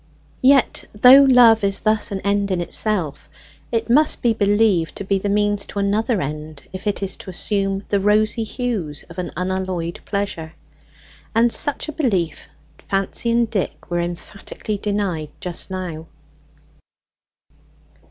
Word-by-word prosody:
Yet, 270 -1 +3
though 250 +6 +8
love 235 -4 +6
is 195 -1 0
thus 215 0 +1
an 195 -1 -3
end 200 0 0
in 185 -2 0
itself, 175 -3 -2 0.4
it 230 -1 -1
must 295 +6 +3
be 235 -2 +3
believed 205 -5 +2
to - - -5
be 195 0 0
the 200 - -2
means 205 0 +1
to - - -9
another 210 +3 +1
end 150 +1 -7
if 185 +3 -6
it 200 -1 -1
is 190 -1 -1
to - - -10
assume 195 +1 -1
the 200 - +2
rosy 215 +3 +2
hues 215 - -3
of 175 - -8
an 180 - -3
unalloyed 185 -2 -3
pleasure. 195 -6 -4 0.8
And 235 +1 +4
such 290 - +1
a - - -3
belief 195 - -1 0.3
Fancy 195 +4 -2
and 235 0 +2
Dick 200 -4 -4
were 175 - 0
emphatically 195 +4 -5
denied 195 -7 -2
just 180 +1 -4
now. 175 -4 -5
200 Hz, 145 wpm, -20 LUFS, 180-220 Hz, 0.8 s, though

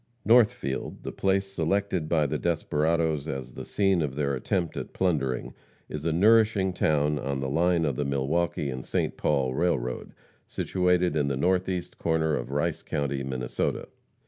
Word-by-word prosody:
Northfield, 110 - +2
the - - -4
place 95 0 +1
selected 95 -2 -1
by 80 -3 +3
the 75 +1 -2
desperadoes 80 -2 0
as 65 -4 -5
the - - -7
scene 95 -4 +2
of 70 -4 -2
their 70 -1 0
attempt 85 +5 -1
at - - -6
plundering, 70 -9 -1 0.4
is 75 0 -5
a 85 - +2
nourishing 105 +1 +4
town 75 -3 +1
on 70 -1 -2
the 65 - -2
line 85 +4 +2
of 70 -4 -1
the 75 - 0
Milwaukee 70 +2 -1
and 65 0 -5
St. - - -1
Paul 65 -2 0
railroad, 70 -6 -1 0.3
situated 90 -2 +1
in 75 -2 +1
the 70 -2 -1
northeast 90 +3 -1
corner 80 -2 +1
of - - -4
Rice 75 +4 -1
county, 70 -1 -2
Minnesota. 65 -2 -2
80 Hz, 160 wpm, -27 LUFS, 70-90 Hz, 0.4 s, nourishing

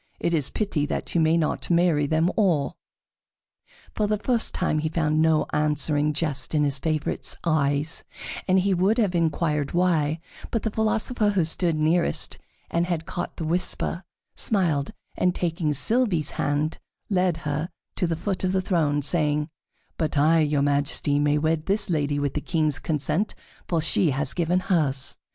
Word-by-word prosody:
It 170 - 0
is 150 -5 +1
pity 170 -9 -1
that - - -4
you 170 - +2
may 160 +1 +3
not 160 -2 -1
marry 170 -4 +3
them 160 +4 +2
all." 170 -10 +1 1.2
For 210 - 0
the 210 0 +1
first 230 +2 +1
time 155 -4 0
he 155 +1 -1
found 155 -1 +1
no 160 -1 +3
answering 150 0 +1
jest 150 -2 -2
in 150 - +3
his 140 -2 +1
favorite's 155 +1 -1
eyes, 150 -1 +1 0.4
and 190 0 +4 0.2
would 205 +5 +3
have 205 -6 +1
inquired 155 -3 0
why, 165 -3 +1 0.3
but 230 - -2
the 220 - -1
philosopher 220 +1 +1
who 190 -5 +1
stood 165 +1 +1
nearest, 160 +3 +1 0.3
and 170 +1 0
had 165 -3 -2
caught 175 - -5
the 165 - -4
whisper, 175 +1 0 0.3
smiled, 165 -9 +1 0.3
and 180 0 +1
taking 165 -3 -1
Sylvie's 180 - +2
hand, 145 +2 -1 0.3
led 180 -3 +2
her 150 +3 -2 0.3
to 180 - +1
the 165 - -1
foot 190 +3 -3
of 185 0 0
the 190 - +2
throne, 155 -6 0
saying: 150 0 +1 0.5
"But 155 -3 -1
I, 160 +3 +4
your 150 -2 +1
Majesty, 145 0 +1
may 145 0 +2
wed 155 +1 0
this 200 -1 +1
lady 145 -2 0
with 145 -2 -1
the 150 - -2
King's 155 -4 0
consent, 155 +6 -1 0.3
for 170 - 0
she 160 +1 +3
has 140 +2 0
given 175 +1 +1
hers." 145 -8 -1
160 Hz, 165 wpm, -24 LUFS, 150-180 Hz, 1.2 s, and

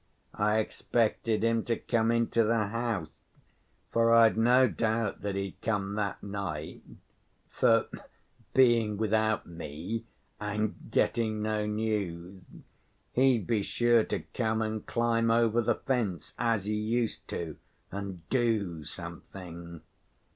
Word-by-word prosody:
I 105 +1 +2
expected 110 0 0
him 115 0 +2
to 115 -2 0
come 115 -1 +1
into 115 0 +2
the 110 -2 +1
house, 110 - -3 0.7
for 115 0 +3
I'd 115 -1 +6
no 125 +3 +5
doubt 110 -1 -1
that 100 -1 -2
he'd 100 -1 -4
come 100 -3 -1
that 105 -2 -2
night, 100 -7 -5 0.7
for 115 -3 +4 0.7
being 115 -5 +4
without 110 0 +1
me 85 +7 -6 0.3
and 105 0 -1 0.2
getting 110 -2 +1
no 105 -1 0
news, 100 -4 -2 0.7
he'd 125 -5 +3
be 115 -3 +1
sure 120 +2 +3
to - - -2
come 110 -2 0
and 110 -1 -3
climb 115 -1 +1
over 115 0 +3
the 110 - +1
fence, 110 - -2
as 115 -4 +1
he 105 - -1
used 110 +2 -1
to, 80 -3 -5 0.3
and 95 -4 -6
do 110 -10 0
something." 85 +1 -9
110 Hz, 125 wpm, -29 LUFS, 100-115 Hz, 0.7 s, I'd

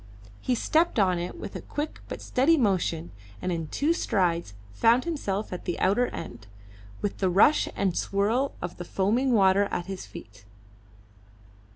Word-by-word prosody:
He 250 - 0
stepped 320 +6 +1
on 185 -4 +3
it 175 - -5
with - - -7
a - - -5
quick 295 +1 -5
but - - -6
steady 285 +6 +3
motion, 180 - 0 0.3
and 185 - -2
in 165 -2 -3
two 295 - +1
strides 170 - 0 0.2
found 230 - +3
himself 215 - -3
at 180 - -7
the 175 - -2
outer 205 +7 +2
end, 120 -9 -8 0.6
with 205 - -2
the 190 - +2
rush 200 +12 +4
and 190 -3 0
swirl 220 +8 0
of 175 - -5
the 175 - -5
foaming 215 +9 +1
water 195 -1 +4
at 175 - -3
his 190 -1 -7
feet. 105 -2 -12
195 Hz, 165 wpm, -27 LUFS, 175-245 Hz, 0.6 s, rush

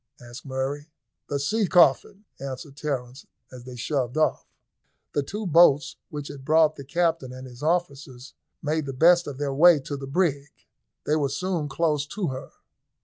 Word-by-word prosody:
asked 120 +3 -11
Murray. 135 +3 -3 0.4
"The 145 - -1
sea 210 +8 0
coffin," 180 +5 +3
answered 135 +1 -7
Terence, 135 -3 -5 0.2
as 125 -1 -11
they 125 -1 -9
shoved 125 +1 -2
off. 155 - +1 0.7
The 145 - +1
two 205 +10 -5
boats 150 -5 +4
which 145 -2 -6
had 135 -2 -9
brought 155 +1 +3
the 140 - -9
captain 165 -2 -1
and 130 +1 -9
his 125 0 -12
officers 145 -6 -2 0.3
made 155 0 -1
the 135 - -4
best 175 +6 +4
of 140 -2 -6
their 140 -1 -2
way 165 +2 +6
to 145 - -5
the 135 -1 -7
brig. 145 -2 0 0.6
They 150 - +2
were 140 -3 0
soon 155 +1 -2
close 150 0 0
to 190 0 -3
her. 130 0 -7
145 Hz, 170 wpm, -25 LUFS, 135-160 Hz, 0.7 s, way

